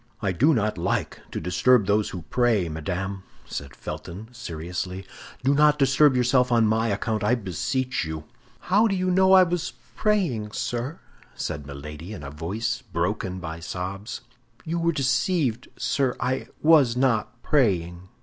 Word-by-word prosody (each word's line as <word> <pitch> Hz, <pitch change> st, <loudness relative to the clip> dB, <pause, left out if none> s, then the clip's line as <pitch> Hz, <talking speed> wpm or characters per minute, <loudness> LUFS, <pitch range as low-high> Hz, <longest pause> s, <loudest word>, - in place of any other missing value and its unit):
"I 100 Hz, -3 st, 0 dB
do 130 Hz, -, +4 dB
not 105 Hz, -4 st, 0 dB
like -, -, -1 dB
to -, -, -4 dB
disturb 100 Hz, +7 st, +3 dB
those 105 Hz, +1 st, +2 dB
who 90 Hz, -3 st, -7 dB
pray, 120 Hz, -7 st, +2 dB
madame," 95 Hz, +5 st, -3 dB, 0.2 s
said 70 Hz, -2 st, -6 dB
Felton, 105 Hz, +6 st, -7 dB
seriously; 90 Hz, -2 st, -5 dB, 0.4 s
"do 135 Hz, +2 st, +4 dB
not 150 Hz, +1 st, +5 dB
disturb 135 Hz, 0 st, +4 dB
yourself 125 Hz, 0 st, +3 dB
on 115 Hz, -2 st, +4 dB
my 110 Hz, +1 st, +2 dB
account, 110 Hz, +1 st, -1 dB
I 125 Hz, -, +3 dB
beseech 120 Hz, -, -2 dB
you." 80 Hz, -1 st, -5 dB, 0.4 s
"How 205 Hz, +5 st, +3 dB
do 195 Hz, -, 0 dB
you 185 Hz, 0 st, 0 dB
know 190 Hz, +1 st, +5 dB
I 190 Hz, -1 st, +9 dB
was 175 Hz, -1 st, -2 dB, 0.2 s
praying, 165 Hz, -, 0 dB
sir?" 120 Hz, +5 st, -3 dB, 0.4 s
said 75 Hz, -1 st, -4 dB
Milady, 75 Hz, +6 st, -8 dB
in 90 Hz, -, -8 dB
a 70 Hz, -, -6 dB
voice 105 Hz, +10 st, -3 dB
broken 90 Hz, +2 st, -2 dB
by 80 Hz, -3 st, -6 dB
sobs. 95 Hz, +7 st, -5 dB, 0.4 s
"You 170 Hz, +2 st, -1 dB
were 170 Hz, 0 st, +2 dB
deceived, 130 Hz, -2 st, 0 dB
sir; 125 Hz, +2 st, 0 dB
I 125 Hz, +1 st, -1 dB, 0.2 s
was 145 Hz, -7 st, +5 dB
not 120 Hz, -2 st, 0 dB
praying." 90 Hz, -, +1 dB
115 Hz, 155 wpm, -25 LUFS, 90-135 Hz, 0.4 s, I